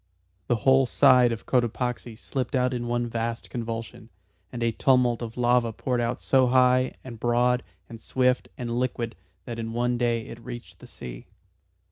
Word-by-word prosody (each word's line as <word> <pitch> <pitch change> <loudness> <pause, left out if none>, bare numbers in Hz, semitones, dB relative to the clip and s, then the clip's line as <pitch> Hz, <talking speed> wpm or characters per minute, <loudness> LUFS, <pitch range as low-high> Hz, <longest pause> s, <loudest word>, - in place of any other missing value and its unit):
The 120 - +2
whole 130 +3 +4
side 125 0 +5
of 115 - -5
Cotopaxi 120 -1 -1
slipped 130 +1 -3
out 125 0 +2
in 120 -1 -3
one 120 0 0
vast 115 0 -4
convulsion, 115 0 -5 0.4
and 120 -1 -4
a 115 - +2
tumult 125 0 +2
of 115 0 -6
lava 120 -1 +2
poured 125 +2 -2
out 120 +1 -1
so 130 -1 +3
high 130 0 +3
and 120 -4 -9
broad 120 +1 +2 0.3
and 115 -2 -10
swift 125 +2 +1
and 120 -1 -2
liquid 120 -2 -2 0.3
that 115 -1 -6
in 115 0 -4
one 120 +1 0
day 120 -2 0
it 115 0 -10
reached 120 -1 -9
the - - -13
sea. - - -9
120 Hz, 170 wpm, -26 LUFS, 115-125 Hz, 0.4 s, side